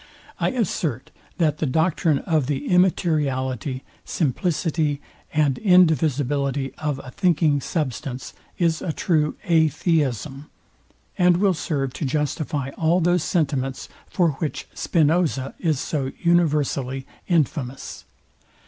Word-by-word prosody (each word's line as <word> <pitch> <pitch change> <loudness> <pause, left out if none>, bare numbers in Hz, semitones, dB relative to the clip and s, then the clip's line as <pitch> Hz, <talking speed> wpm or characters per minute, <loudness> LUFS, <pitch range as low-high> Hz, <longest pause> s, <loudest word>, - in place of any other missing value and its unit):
I - - +2
assert, 170 - -2 0.3
that 155 -4 +1
the 155 - 0
doctrine 160 +2 +2
of 155 -6 +1
the 145 0 -2
immateriality, 140 -8 +1 0.2
simplicity, 155 -1 0 0.3
and 150 -4 +1
indivisibility 145 - +2
of 150 -3 -2
a 130 - -9
thinking 155 -5 +2
substance 135 -4 -4 0.2
is 165 -3 +1
a 170 - -2
true 155 -4 +1
atheism, 155 - +1 0.7
and 180 -1 +5
will 195 0 +3
serve 140 -4 -2
to 155 - -4
justify 145 0 -1
all 165 +2 +3
those 175 -1 +2
sentiments, 135 -6 -1 0.2
for 175 -4 +2
which 155 - -3
Spinoza 155 -4 +1
is 155 -6 0
so 135 -3 -2
universally 145 -6 +1 0.2
infamous. 145 -6 -1
150 Hz, 110 wpm, -23 LUFS, 135-170 Hz, 0.7 s, and